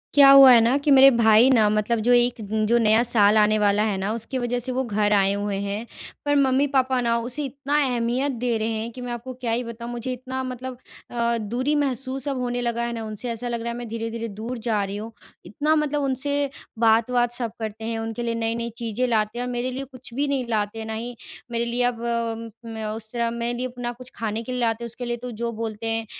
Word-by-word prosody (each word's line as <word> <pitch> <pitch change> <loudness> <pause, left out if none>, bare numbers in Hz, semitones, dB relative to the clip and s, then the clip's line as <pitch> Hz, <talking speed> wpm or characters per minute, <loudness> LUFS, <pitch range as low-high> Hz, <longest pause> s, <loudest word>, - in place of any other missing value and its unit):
क्या 280 -1 +9
हुआ 275 -1 +10
है 240 - +8
ना, 235 +4 +3
कि 285 +1 0
मेरे 270 0 +9
भाई 230 +1 +5
ना 225 -5 +5
मतलब 215 +2 +1
जो - - +5
एक 245 0 +3
न 215 +1 -1
जो 235 +2 +4
नया 220 -1 +4
साल 215 -3 +4
आने 215 0 +4
वाला 205 0 +3
है 215 -2 0
ना, 195 +2 -2
उसकी 230 +3 -3
वज़ह 245 0 -1
से 250 +2 -2
वो 260 +1 0
घर 210 -3 +1
आए 195 -1 +4
हुए 205 0 -2
हैं। 200 +3 -3 0.4
पर 290 0 +2
मम्मी-पापा 265 -1 +2
ना 235 -1 +1
उसे 250 +6 -1
इतना 275 +2 -2
अहमियत 250 +2 0
दे 240 -2 -1
रहे 220 0 -1
हैं, 225 +1 -3
कि 250 +2 -10
मैं 245 0 -5
आपको 240 +2 -6
क्या 250 -2 -4
ही 235 +2 0
बताऊँ 235 0 -7
मुझे 240 +2 -4
इतना 260 +1 -5
मतलब 255 0 -6 0.3
अ, 235 -1 0
दूरी 240 +7 -1
महसूस 270 -1 -1
अब 275 -2 -1
होने 245 0 -2
लगा 235 0 -1
है 235 - -3
ना 225 -1 -5
उनसे, 215 +3 -4
ऐसा 235 +1 -4
लग 235 -1 -3
रहा 235 +1 -3
है 235 - -6
मैं 240 -1 -6
धीरे-धीरे 230 0 -4
दूर 225 +4 -6
जा 215 -3 +1
रही 200 +1 -4
हूँ। 220 +2 -7 0.3
इतना 290 - 0
मतलब 300 -1 0
उनसे 280 +1 -1 0.3
बात-वात 235 +2 +3
सब 240 -2 -3
करते 220 0 -5
हैं, 225 0 -2
उनके 225 +1 -4
लिए 230 -1 -1
नई-नई 230 +1 -2
चीज़ें 235 +1 -1
लाते 220 0 0
हैं 245 - -2
और 250 - -4
मेरे 245 +1 -2
लिए 265 +2 -4
कुछ 255 -2 -13
भी 285 +3 0
नहीं 275 -3 -1
लाते, 220 0 -2
ना 220 - -4
ही 235 +2 -5 0.4
मेरे 235 0 -1
लिए 240 +1 0
अब 245 -1 0 0.6
म 225 - -7
म 220 0 -5
उस 220 -1 -9
तरह 235 -1 0
मेरे 235 0 -2
लिए 255 +1 -3
ना 240 0 -2
कुछ 250 +1 -11
खाने 220 0 -3
के 255 - -6
लिए 250 0 -2
लाते 230 0 0
हैं, - - -3
उसके 240 +2 -7
लिए 240 0 -2
तो 250 +1 -7
जो 235 0 -1
बोलते 225 0 -5
हैं, 225 0 -1
235 Hz, 245 wpm, -24 LUFS, 225-255 Hz, 0.6 s, हुआ